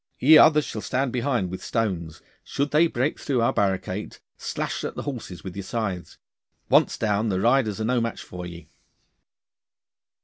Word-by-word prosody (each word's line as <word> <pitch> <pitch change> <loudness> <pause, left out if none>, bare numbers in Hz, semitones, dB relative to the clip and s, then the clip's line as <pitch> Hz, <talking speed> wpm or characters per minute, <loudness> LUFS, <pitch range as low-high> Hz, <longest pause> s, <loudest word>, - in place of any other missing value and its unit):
Ye 155 +5 +7
others 150 -1 +6
shall 110 - -5
stand 130 +2 -1
behind 120 -7 0
with 95 - -6
stones. 90 -9 -2 0.2
Should 140 0 -2
they 160 +3 +5
break 135 0 -1
through 130 -4 0
our 120 +3 +2
barricades, 95 0 -2 0.2
slash - - -4
at - - -4
the - - -5
horses 110 - -6
with 95 -2 -7
your 100 - -4
scythes. 95 -3 -4 0.5
Once - - +4
down, 105 0 0
the 95 -2 0
riders 115 -1 +2
are 110 - -1
no 125 +1 +1
match 115 -1 -3
for 90 0 -8
ye. 85 -3 -10
110 Hz, 170 wpm, -25 LUFS, 95-130 Hz, 0.5 s, Ye